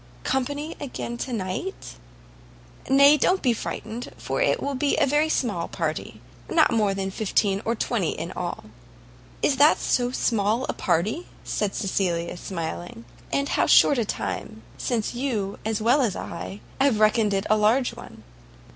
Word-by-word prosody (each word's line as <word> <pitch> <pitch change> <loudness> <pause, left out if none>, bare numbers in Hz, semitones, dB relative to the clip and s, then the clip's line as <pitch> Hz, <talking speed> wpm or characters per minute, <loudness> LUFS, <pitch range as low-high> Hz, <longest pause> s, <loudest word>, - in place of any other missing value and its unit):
"Company 285 +4 -2
again 250 -3 -5
to 265 - -4
night?" 210 - -4 1.0
"Nay, 280 +2 +7
don't 370 +7 +2
be 250 -3 +3
frightened, 225 +1 -5
for - - -3
it - - +2
will 280 - -2
be 280 +2 +1
a - - +4
very 295 +3 +2
small 210 - 0
party; - - -4 0.3
not 320 -5 +4
more 210 -3 +2
than 195 0 -2
fifteen 200 -1 0
or 230 - +1
twenty - - 0
in - - -5
all." - - -4 0.8
"Is 275 - +3
that 295 +3 +6
so 245 -1 +1
small 230 -1 +1
a - - -1
party?" 215 - 0 0.2
said 205 -2 -2
Cecilia, 175 -4 -1
smiling; 160 - -6 0.3
"and 280 0 0
how - - +2
short 280 - +6
a - - +2
time 220 +1 -4
since 235 -3 -2
would 245 - -5
you, 210 -8 -2
as 220 0 -1
well 250 +6 +4
as 225 -7 0
I, 95 +4 -6 0.2
have 265 -5 +3
reckoned 215 -1 +3
it 195 +1 -1
a 215 - +4
large 225 +5 +2
one!" 110 0 -12
225 Hz, 165 wpm, -25 LUFS, 195-270 Hz, 1.0 s, Nay